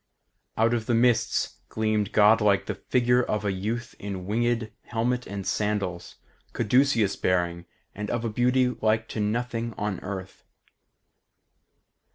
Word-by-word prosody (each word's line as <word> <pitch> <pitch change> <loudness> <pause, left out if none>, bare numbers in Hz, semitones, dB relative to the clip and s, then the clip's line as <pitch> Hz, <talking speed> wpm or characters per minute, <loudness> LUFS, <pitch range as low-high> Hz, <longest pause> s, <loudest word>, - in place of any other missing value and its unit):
Out 115 +2 +3
of 115 -2 -1
the 120 - +2
mists 120 0 +2
gleamed 110 -2 0
godlike 105 -1 +4
the - - -2 0.2
figure 125 0 +3
of 105 -3 -2
a 100 - +1
youth 110 +6 -3
in 95 -2 -5
winged 115 +1 0
helmet 125 +2 -1
and 100 -1 -5
sandals, 100 -4 -2 0.4
caduceus 120 -2 +2
bearing, 85 -1 0 0.3
and 105 0 -5
of 120 -1 -2
a - - 0
beauty 125 +3 +2
like 110 -2 0
to - - -4
nothing 115 +2 -2
on 105 -2 -2
earth. 95 -1 -7
110 Hz, 135 wpm, -26 LUFS, 100-120 Hz, 0.4 s, godlike